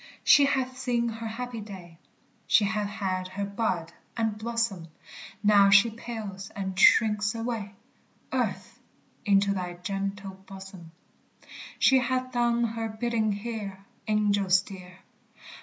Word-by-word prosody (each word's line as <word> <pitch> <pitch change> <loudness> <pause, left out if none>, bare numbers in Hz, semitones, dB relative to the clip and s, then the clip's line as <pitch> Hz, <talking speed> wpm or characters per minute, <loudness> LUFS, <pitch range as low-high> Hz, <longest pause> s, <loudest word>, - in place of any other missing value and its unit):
She 285 - +7
hath 260 -2 -1
seen 240 -2 0
her 225 0 -6
happy 235 0 -5
day, 180 -5 -11 0.5
She 210 - +4
hath 210 0 -1
had 190 -3 -3
her 195 +2 -4
bud 200 -5 -2 0.2
and 220 -2 0
blossom; 220 -5 -2 0.6
Now 205 -1 +6
she 200 +3 +6
pales 215 -4 -7
and 190 -1 -4
shrinks 210 0 +4
away, 225 -3 -4 0.6
Earth, - - -2 0.5
into 200 -1 +3
thy 180 -2 -4
gentle 195 +1 -5
bosom! 190 -3 -11 0.9
She 265 0 +5
hath 255 +1 -1
done 240 -1 +1
her 225 -1 -2
bidding 220 0 -1
here, 200 -2 -6 0.2
Angels 200 -3 +3
dear! 185 -2 -12
210 Hz, 125 wpm, -27 LUFS, 195-230 Hz, 0.9 s, She